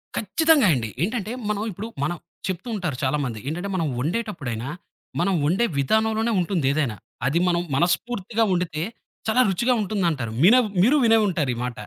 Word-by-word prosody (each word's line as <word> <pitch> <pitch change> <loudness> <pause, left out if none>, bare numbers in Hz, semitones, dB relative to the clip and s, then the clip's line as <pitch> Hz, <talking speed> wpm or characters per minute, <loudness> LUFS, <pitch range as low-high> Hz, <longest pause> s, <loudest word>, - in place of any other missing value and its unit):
ఖచ్చితంగా 300 - +3
అండి. 115 -4 -2
ఏంటంటే 220 +1 -2 0.2
మనం 210 0 -1
ఇప్పుడు, 200 +5 -6 0.2
మనం 165 +4 -1 0.3
చెప్పుతూ 190 +6 -4
ఉంటారు 160 -10 -3
చాలామంది. 130 -5 -1
ఏంటంటే 175 +6 -3
మనం 165 -4 0
ఓండేటప్పుడైనా, 145 - -3 0.5
మనం 190 +2 +2
ఓండే 195 +9 +2
విధానంలోనే 220 - +1
ఉంటుంది 175 -5 0
ఏదైనా. 135 -8 -1 0.3
అది 160 +6 +2
మనం 175 -1 +2
మనస్ఫూర్తిగా 215 - 0
ఓండితే 165 -3 -1 0.4
చాలా 245 +4 +4
రుచిగా 240 +7 +2
ఉంటుందంటారు. 170 - -1
మినే 235 +7 +7 0.2
మీరు 265 +9 +5
వినే 225 0 +5
ఉంటారు 155 -8 0
ఈ - - -8
మాట. 125 - -5
180 Hz, 150 wpm, -23 LUFS, 150-220 Hz, 0.5 s, మినే